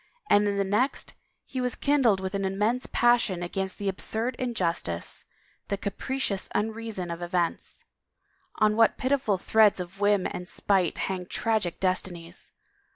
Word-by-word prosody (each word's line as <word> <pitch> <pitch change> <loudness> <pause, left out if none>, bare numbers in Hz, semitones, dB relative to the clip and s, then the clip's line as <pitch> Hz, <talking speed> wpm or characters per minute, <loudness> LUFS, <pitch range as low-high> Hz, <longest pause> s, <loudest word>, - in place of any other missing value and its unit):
And 205 0 +5
in 200 -1 0
the 200 - +2
next 210 +8 0 0.3
he 260 - -4
was 250 -1 0
kindled 265 -9 +3
with 190 +1 -4
an 200 0 -1
immense 210 +6 0
passion 235 -7 +2
against 190 +2 -3
the 200 - -4
absurd 220 +5 -1
injustice, 170 - -1 0.4
the 200 - -1
capricious 200 0 -2
unreason 220 -4 -2
of 170 +1 -5
events. 175 -1 -2 0.7
On 215 0 +3
what 225 0 +4
pitiful 260 -7 +1
threads 215 +1 +4
of 180 +2 -7
whim 205 -2 +3
and 180 - -4
spite 190 -5 +1
hang 185 -2 -3
tragic 215 -7 0
destinies! 180 -2 -2
200 Hz, 145 wpm, -27 LUFS, 185-225 Hz, 0.7 s, And